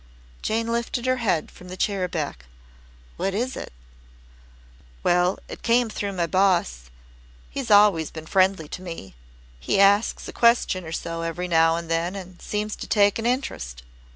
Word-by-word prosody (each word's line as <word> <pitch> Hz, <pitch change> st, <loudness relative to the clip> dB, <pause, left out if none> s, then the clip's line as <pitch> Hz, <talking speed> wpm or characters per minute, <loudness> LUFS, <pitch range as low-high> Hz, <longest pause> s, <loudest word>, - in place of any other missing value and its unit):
Jane 225 Hz, +1 st, 0 dB
lifted 235 Hz, +1 st, -2 dB
her 255 Hz, 0 st, +2 dB
head 195 Hz, -10 st, 0 dB
from 180 Hz, -, -14 dB
the 185 Hz, +1 st, -8 dB
chair 190 Hz, -1 st, 0 dB
back. 145 Hz, -, -4 dB, 0.7 s
"What 195 Hz, 0 st, -1 dB
is 250 Hz, +5 st, -1 dB
it?" -, -, -7 dB, 1.3 s
"Well, 180 Hz, +1 st, +3 dB
it -, -, -9 dB
came 235 Hz, -1 st, +2 dB
through 200 Hz, -1 st, -3 dB
my 175 Hz, -2 st, 0 dB
boss. 170 Hz, -, +1 dB, 0.6 s
He's 270 Hz, -4 st, -4 dB
always 205 Hz, -6 st, +5 dB
been 160 Hz, -1 st, -9 dB
friendly 185 Hz, -2 st, +2 dB
to 180 Hz, -, -7 dB
me. 165 Hz, -, -8 dB, 0.5 s
He 65 Hz, -, 0 dB
asks 200 Hz, +2 st, +3 dB
a -, -, -7 dB
question 235 Hz, -6 st, +3 dB
or 160 Hz, -, -7 dB
so 165 Hz, 0 st, -4 dB
every 165 Hz, +2 st, -3 dB
now 165 Hz, -1 st, +4 dB
and 170 Hz, 0 st, -4 dB
then 165 Hz, +3 st, -1 dB
and 185 Hz, -2 st, -9 dB
seems 210 Hz, 0 st, -3 dB
to -, -, -7 dB
take 205 Hz, 0 st, +3 dB
an 225 Hz, -, -1 dB
interest. 60 Hz, -, -3 dB
185 Hz, 165 wpm, -24 LUFS, 165-210 Hz, 1.3 s, always